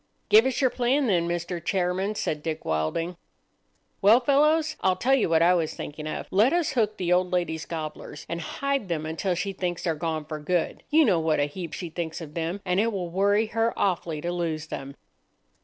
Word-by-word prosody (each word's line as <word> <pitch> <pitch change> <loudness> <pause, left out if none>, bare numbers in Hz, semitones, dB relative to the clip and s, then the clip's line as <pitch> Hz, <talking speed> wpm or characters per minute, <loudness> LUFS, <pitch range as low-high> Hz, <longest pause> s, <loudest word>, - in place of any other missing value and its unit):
"Give 220 +4 +7
us 265 - -1
your 260 -2 +3
plan, 260 +3 +1
then, 175 -7 +2
Mr. 175 0 -3
Chairman," 190 +2 0
said 150 -6 -2
Dick 160 0 -4
Wilding. 80 - -1 0.8
"Well, 215 +5 +7
fellows, 305 +4 +3
I'll 185 -1 +3
tell 250 +9 +1
you 265 -9 +3
what 165 0 +4
I 175 +2 +5
was 165 -3 0
thinking 150 +1 -6
of. - - -4
Let 215 - +4
us 345 -3 +1
hook 215 -4 0
the 180 -1 +1
old 180 0 +2
lady's 170 -3 -1
gobblers, 155 -2 -6
and 170 0 -4
hide 275 - -2
them 160 -3 -2
until 165 +4 -1
she 195 +3 -2
thinks 175 -2 -3
they're 165 - +1
gone 160 -1 -3
for 155 0 -5
good. 170 +3 -1
You 310 +1 +5
know 185 -8 +3
what 160 -2 +1
a - - +3
heap 165 +2 -7
she 175 -3 -5
thinks 160 0 -4
of 155 -3 -9
them, 170 +4 -3
and 180 0 +1
it 230 +2 +2
will 180 -5 -4
worry 200 +4 +3
her 225 +1 +1
awfully 170 -5 -1
to 175 - -2
lose 165 -3 -3
them." 140 0 -6
175 Hz, 210 wpm, -26 LUFS, 160-210 Hz, 0.8 s, Give